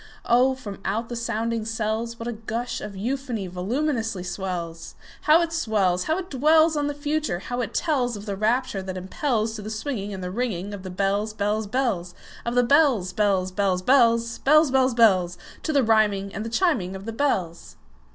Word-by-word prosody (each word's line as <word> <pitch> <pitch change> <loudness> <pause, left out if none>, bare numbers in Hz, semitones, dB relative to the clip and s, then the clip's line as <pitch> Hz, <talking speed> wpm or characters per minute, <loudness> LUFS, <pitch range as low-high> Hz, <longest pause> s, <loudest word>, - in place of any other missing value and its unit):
Oh, 255 +2 +4
from 205 -7 -8
out 225 +4 -2
the 240 - -4
sounding 230 -1 -2
cells, 225 +1 -2
What 230 - -6
a - - -1
gush 230 +2 -4
of 210 -1 -7
euphony 240 0 -3
voluminously 225 - -2
wells! 170 -3 -5 0.3
How 325 +3 +7
it 330 -1 -4
swells! 200 - +1
How 315 - +1
it 375 -1 -6
dwellsOn 305 +2 +4
the 290 - -3
Future! 295 - -1
how 245 +7 -4
it 230 -1 -5
tellsOf 245 - 0
the 200 -2 -3
rapture 220 0 0
that 190 0 -6
impelsTo 220 - -2
the 215 - -6
swinging 215 -2 -4
and 190 -2 -6
the 180 - -4
ringingOf 205 -3 -3
the 185 - -7
bells, 200 +3 -1
bells, 210 +1 -1
bells, 200 -7 -1 0.3
Of 235 - -1
the 245 - +5
bells, 245 - +3
bells, 190 -2 +1
bells, 185 -1 0
bells, 230 -2 +3
Bells, 305 0 +5
bells, 260 -2 +3
bells—To 185 - +1
the 280 -3 +3
rhyming 210 -3 +2
and 215 - -4
the 225 - -4
chiming 230 - +1
of 190 +1 -8
the 225 - -4
bells! 190 - -2
225 Hz, 180 wpm, -24 LUFS, 195-255 Hz, 0.3 s, How